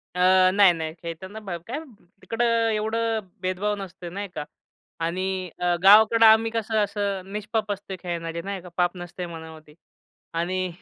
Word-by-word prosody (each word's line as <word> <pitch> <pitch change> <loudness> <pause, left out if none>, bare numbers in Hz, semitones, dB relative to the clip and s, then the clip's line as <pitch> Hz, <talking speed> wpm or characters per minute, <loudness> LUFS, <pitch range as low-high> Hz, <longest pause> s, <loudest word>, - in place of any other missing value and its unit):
अ, - - -3 0.3
नाही-नाही 170 -6 +4
खेळताना 185 +5 -7
ब 190 -5 -5
काय 255 +6 -3 0.4
तिकडं 230 +1 -1 0.3
एवढं 225 +1 0 0.2
भेदभाव 185 +3 -1
नसतंय 185 -3 -8
नाही 200 +3 -5
का? - - -3 0.6
आणि 185 +2 -2
अ, 175 0 +2
गावाकडं 220 +3 +7
आम्ही 220 +1 +6
कसं 220 -1 0
असं 200 -2 -3
निष्पाप 210 0 -2
असतोय 200 -1 -5
खेळणारे, 170 -1 -4
नाही 195 +1 -5
का? 180 - -11
पाप 180 0 +1
नसतंय 175 0 -6
मनामध्ये 160 -2 -11 0.6
आणि 185 +2 -1
190 Hz, 145 wpm, -25 LUFS, 175-210 Hz, 0.6 s, गावाकडं